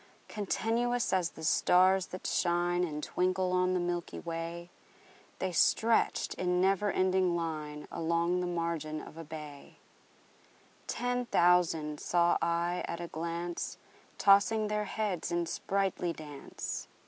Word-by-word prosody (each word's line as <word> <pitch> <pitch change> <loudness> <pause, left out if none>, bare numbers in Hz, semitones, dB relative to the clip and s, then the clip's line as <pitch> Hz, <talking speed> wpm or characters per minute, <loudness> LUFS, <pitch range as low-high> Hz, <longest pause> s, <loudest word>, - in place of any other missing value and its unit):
Continuous 230 +3 0
as 180 -3 +2
the 160 - -12
stars 185 +3 +4
that 185 - -8
shine 175 0 +1
And 150 -3 -3
twinkle 185 0 0
on 185 0 +2
the - - +1
milky 175 -1 -3
way, 170 +1 -5 0.7
The 185 -1 -2
stretched 225 +6 +2
in 180 0 0
never 195 +2 +2
ending 185 -1 +2
line 155 -3 -4
Along 170 +2 0
the 180 - -1
margin 165 -3 -2
of - - -11
a 165 - -7
bay: 150 -2 -10 1.1
Ten 245 0 -1
thousand 170 -6 +3
saw 175 0 +2
I 170 +1 0
at 170 - -4
a 170 -1 -5
glance, 170 +2 -4 0.4
Tossing 205 +2 +4
their 210 0 -1
heads 200 -5 -2
in 170 0 0
sprightly 190 0 -1
dance. 150 -3 -7
175 Hz, 130 wpm, -31 LUFS, 165-190 Hz, 1.1 s, stars